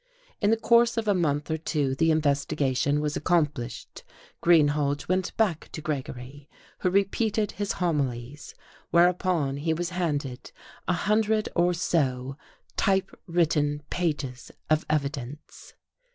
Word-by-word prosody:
In 205 - +3
the 225 - +3
course 235 +1 +4
of 225 -1 -1
a 205 - +4
month 150 -4 0
or 160 - -1
two 145 -4 -1
the 160 +4 +2
investigation 145 -2 +1
was 150 0 -2
accomplished, 150 -8 -1 0.4
Greenhalge 145 -4 +3
went 185 0 -1
back 195 -8 0
to 155 - -5
Gregory; 140 -1 -6 0.3
who 185 - +1
repeated 200 +2 +1
his 205 -1 -2
homilies, 145 -5 -2 0.3
whereupon 170 -5 +2
he 160 +2 0
was 175 +1 -3
handed 145 -8 -3 0.4
a 180 - +2
hundred 215 +4 +1
or 175 0 +3
so 135 -6 0 0.4
typewritten 165 -6 0
pages 145 -8 -2 0.2
of 155 0 +2
evidence. 140 -2 -4
155 Hz, 125 wpm, -26 LUFS, 145-180 Hz, 0.4 s, course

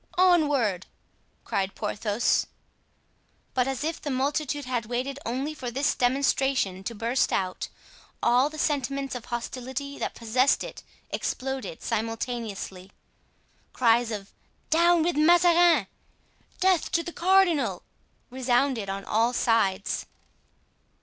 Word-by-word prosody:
"Onward!" 290 - +3 0.6
cried 195 0 -2
Porthos. 210 +2 0 1.1
But 250 0 +1
as 270 +1 -2
if 320 +1 -3
the 295 - -4
multitude 285 +1 -1
had 245 -4 -2
waited 255 +4 -3
only 265 +6 -2
for 260 -5 -5
this 275 +5 +1
demonstration 255 -6 +1
to 235 - -4
burst 235 +4 0
out, 185 -1 -1 0.6
all 250 +4 +4
the 310 - -10
sentiments 275 -2 -1
of 250 -3 -6
hostility 260 +3 -5
that - - -3
possessed 245 +4 +2
it - - -8 0.3
exploded 260 -9 -4
simultaneously. 225 -4 -4 0.8
Cries 235 -1 +3
of 200 -3 -6 0.4
"Down 340 0 +4
with 345 +1 0
Mazarin!" 340 - +5 0.7
"Death 370 -3 +2
to 335 - +2
the 345 - -7
cardinal!" 365 -4 +2 0.5
resounded 250 -3 +1
on 195 0 -4
all 230 +3 +2
sides. 215 -5 +1
255 Hz, 115 wpm, -26 LUFS, 230-290 Hz, 1.1 s, Mazarin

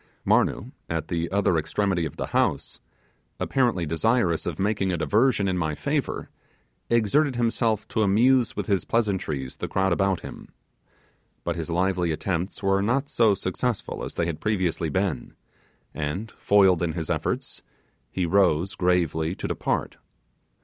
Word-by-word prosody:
Marnoo, - - +2 0.2
at 80 -1 -3
the 85 0 -2
other 95 -4 +2
extremity 90 +2 0
of 70 - -11
the - - -2
house, - - 0 0.6
apparently 120 -10 +1
desirous 85 +2 +1
of 85 -3 -3
making 100 -1 0
a 90 - -1
diversion 105 - +2
in 90 -1 0
my 80 -3 -1
favour, - - -2 0.6
exerted 120 +5 +2
himself 115 -2 0
to 110 - 0
amuse 120 +5 +3
with - - -3
his 100 -5 +1
pleasantries 95 - -1
the - - -4
crowd 95 -1 +1
about 95 0 +1
him; - - -10 0.9
but 85 - -2
his 85 -1 -4
lively 90 0 +1
attempts 90 +3 -3
were 95 0 +2
not 135 +7 0
so 110 -4 +3
successful 100 +6 -3
as - - -6
they 85 - 0
had 85 -2 -4
previously 95 -6 0
been, 95 -5 -2 0.6
and, 85 +9 -4
foiled 95 -4 +4
in 85 -2 0
his 80 -2 -3
efforts, - - -2 0.5
he 90 - -1
rose 90 -1 +2
gravely 85 -2 +1
to - - -4
depart. - - -2
95 Hz, 150 wpm, -25 LUFS, 85-105 Hz, 0.9 s, foiled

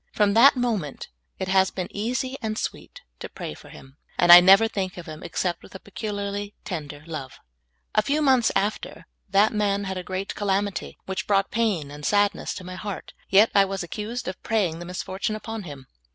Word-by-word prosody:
From 205 -1 +2
that 255 +7 +7
moment 220 - -2 0.3
it 190 - -3
has 190 0 +3
been 185 -2 -4
easy 255 +5 -2
and 215 -1 -3
sweet - - -5 0.2
to - - -7
pray - - -6
for - - -14
him, 135 +2 -14 0.2
and 175 0 +5
I 175 - +13
never 195 +5 +7
think 190 -4 -4
of 175 - -8
him 155 -1 -9
except 175 -2 -2
with - - -15
a - - -7
pecul 205 +2 -6
iarly 200 0 -4
tender 150 -5 -6
love. 155 -6 -6 0.6
A 215 - +4
few 280 +8 0
months 265 -5 +3
after, 205 +2 -2 0.2
that 200 +3 +4
man 205 -1 0
had 190 -1 -3
a - - -6
great 185 +2 -4
calamity 200 -1 -2
which 190 0 -4
brought 195 -1 +2
pain 200 -11 0
and 145 0 -10
sadness 205 +4 +1
to 185 - -7
my 185 0 -8
heart; 205 -1 -6 0.2
yet 205 +3 +6
I 200 - +6
was 195 -1 -4
accused 215 +7 -5
of 185 - -5
prajnng 190 -8 0
the 175 - -7
misfortune 190 +4 -3
upon 220 -1 -6
him. 140 -4 -9
195 Hz, 200 wpm, -24 LUFS, 180-215 Hz, 0.6 s, I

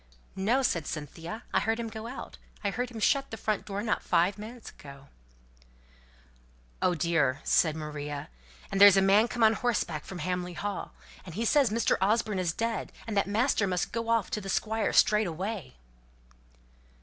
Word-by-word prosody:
"No!" 230 +8 +1
said 170 - 0
Cynthia. 165 - -6
"I - - +4
heard 225 +1 0
him 230 - -3
go 220 0 -7
out. 250 - -8 0.2
I 200 - 0
heard 245 +3 -2
him 230 -2 -8
shut 275 +6 +2
the 225 - -6
front 215 0 -2
door 200 0 -4
not 220 - 0
five 185 +5 +1
minutes 225 +2 -9
ago." 140 -1 -13 1.7
"Oh, 180 - +2
dear!" 150 -5 +1
said 160 -2 +3
Maria. 150 -2 -5 0.4
"And 195 - 0
there's 200 -1 +9
a - - +5
man 200 +4 +5
come 240 -1 -1
on 220 0 +6
horseback 210 -10 -1
from 190 - -8
Hamley 180 0 -3
Hall, 205 +3 -5 0.3
and 175 -3 -10
he 225 +3 -1
says 275 -2 +4
as 230 +1 0
Mr. - - +3
Osborne 210 0 +1
is 180 -2 0
dead, 230 +5 -3
and 220 -2 -4
that 200 - +2
master 215 0 +1
must 180 -1 -1
go 230 0 -3
off 230 -4 +1
to 210 - -2
the 195 - -7
Squire 220 +3 0
straight 210 -1 +4
away." 180 - -5
205 Hz, 185 wpm, -29 LUFS, 175-225 Hz, 1.7 s, there's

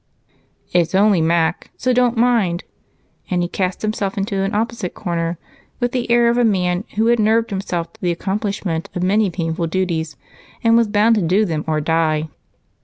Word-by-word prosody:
"It's 175 +1 +2
'only 200 -3 +4
Mac,' 165 +1 +1
so 255 - +1
don't 245 -1 +2
mind," 225 -7 +2 0.7
and 180 -1 +1
he - - -1
cast 185 +2 -3
himself 210 -2 -2
into 195 0 -1
an 195 +1 -1
opposite 225 -4 -2
corner 170 -3 -2 0.4
with 245 -1 0
the 250 -1 -2
air 235 0 +4
of 235 +1 +2
a - - +4
man 180 -3 +1
who 220 +2 +2
had 235 0 +3
nerved 225 +2 +2
himself 175 -4 -3
to 220 - -23
the 180 -2 +1
accomplishment 190 -2 -3
of 180 - -2
many 205 +2 +2
painful 165 -1 -2
duties 165 -4 -2 0.5
and 230 0 +4
was 230 -1 +4
bound 210 +2 +3
to - - +1
do 185 +5 +2
them 160 -5 -2
or 155 -1 0
die. 155 0 0
195 Hz, 180 wpm, -19 LUFS, 170-220 Hz, 0.7 s, only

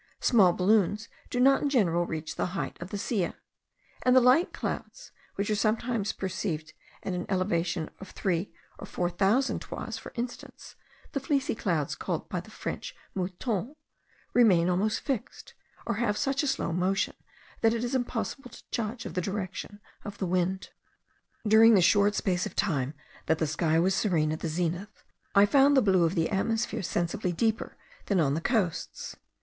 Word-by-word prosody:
Small 200 -7 +5
balloons 205 +3 +2 0.2
do 245 - -2
not 270 +2 +5
in 290 - +1
general 175 - +2
reach 160 0 -4
the - - -1
height - - -3
of 175 - -6
the 205 - -4
Silla; 200 -3 -1 0.7
and 250 0 +4
the - - +9
light 255 +8 +4
clouds - - -5 0.2
which 200 +1 -1
are - - +2
sometimes 220 0 0
perceived 175 -4 -4 0.3
at 190 - -2
an 180 0 -3
elevation 175 -4 0
of 195 - -10
three 180 0 -1 0.3
or - - -8
four 175 0 -1
thousand 205 +9 +2
toises, - - -6
for - - -10
instance, 245 0 -7 0.4
the 280 - -1
fleecy 275 0 0
clouds, 170 -9 -1
called - - -3
by - - -2
the - - -11
French - - -6 0.2
moutons, 195 - -3 0.6
remain 185 -8 +5
almost 205 +4 0
fixed, 265 -7 -4 0.3
or - - -1
have 210 -3 0
such 275 0 +1
a 295 - -1
slow 265 -11 -1
motion, 185 +3 +1 0.5
that 225 0 +4
it 230 - -2
is 245 +2 -2
impossible 255 +1 -2
to - - -14
judge 230 +1 -3
of - - -6
the 180 - 0
direction 195 +1 -5 0.2
of 205 -1 -7
the 190 - -2
wind. 185 +1 -1 0.8
During 220 +1 +7
the 190 - +5
short 205 +2 +4
space 180 -2 0
of - - -11
time 145 -7 0 0.3
that 160 - +3
the 160 - 0
sky 155 +1 +1
was 185 +3 +3
serene 165 -7 +1
at 155 - -3
the - - -3
zenith, 175 +5 -3 0.3
I 200 +1 +8
found 275 +5 +5
the - - +7
blue 190 -4 +4
of 165 +4 0
the 165 +2 +1
atmosphere 225 +4 0
sensibly 175 +1 -1
deeper 220 +5 -1 0.3
than 200 -3 +2
on 140 -4 +2
the 160 - -1
coasts. 195 -6 -1
195 Hz, 175 wpm, -28 LUFS, 175-230 Hz, 0.8 s, the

